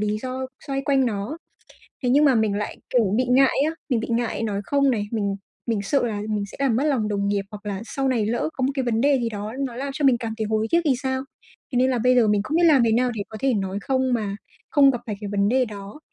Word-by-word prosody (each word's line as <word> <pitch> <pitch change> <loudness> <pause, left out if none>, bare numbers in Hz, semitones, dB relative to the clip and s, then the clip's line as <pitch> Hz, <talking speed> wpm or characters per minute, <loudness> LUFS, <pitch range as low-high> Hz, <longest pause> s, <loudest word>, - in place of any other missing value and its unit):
lý 210 0 0
do 260 +2 -4 0.2
xoay 275 -1 -2
quanh 270 -2 +3
nó, 215 +8 -3 0.6
thế 250 - 0
nhưng 290 +3 +5
mà 270 -3 +5
mình 220 -3 +2
lại, 210 0 -3
kiểu, 220 -6 +2
bị 255 - +2
ngại 265 +1 +4
á, - - -8
mình 245 -4 +1
bị 230 - -5
ngại 230 -1 -1
nói 205 -2 -1
"Không" 280 +1 +2
này, 210 -4 0
mình 200 -3 -1 0.3
mình 220 -4 0
sợ 270 +3 +1
là 210 -2 -3
mình 210 -1 -1
sẽ - - -12
làm 255 -5 +2
mất 275 - +1
lòng 260 -8 +1
đồng 200 -1 -1
nghiệp, 200 -1 0
hoặc 210 -1 -10
là 195 -1 -3
sau 270 +3 -2
này 230 -5 +1
lỡ 235 +6 0
có 260 - -4
một 265 - +2
cái 265 - 0
vấn 230 -2 0
đề 280 +1 +3
gì 230 - 0
đó 210 +1 -5
nó 260 -4 -3
làm 275 +2 -3
cho 290 - -2
mình 250 -3 +5
cảm 225 -2 -4
thấy 220 - -1
hối 220 0 0
tiếc 340 - +4
thì 275 -4 +3
sao? 260 0 -1 0.5
Thế 250 - -1
nên 260 +1 +3
là 250 - 0
bây 250 +2 +3
giờ 230 -3 +4
mình 210 -1 +2
không 305 +9 -2
biết 345 - +4
làm 280 -6 +6
thế 225 - +2
nào 250 +2 +2
để 210 - -3
có 220 - -8
thể 270 -3 +2
nói 195 -1 -2
"Không" 260 -1 0
mà 205 -4 -2 0.3
không 280 -2 +6
gặp 245 - -3
phải 210 -2 -3
cái 205 - -5
vấn 200 0 +2
đề 255 +2 +3
đó, 205 +3 -9
235 Hz, 285 wpm, -23 LUFS, 210-265 Hz, 0.6 s, làm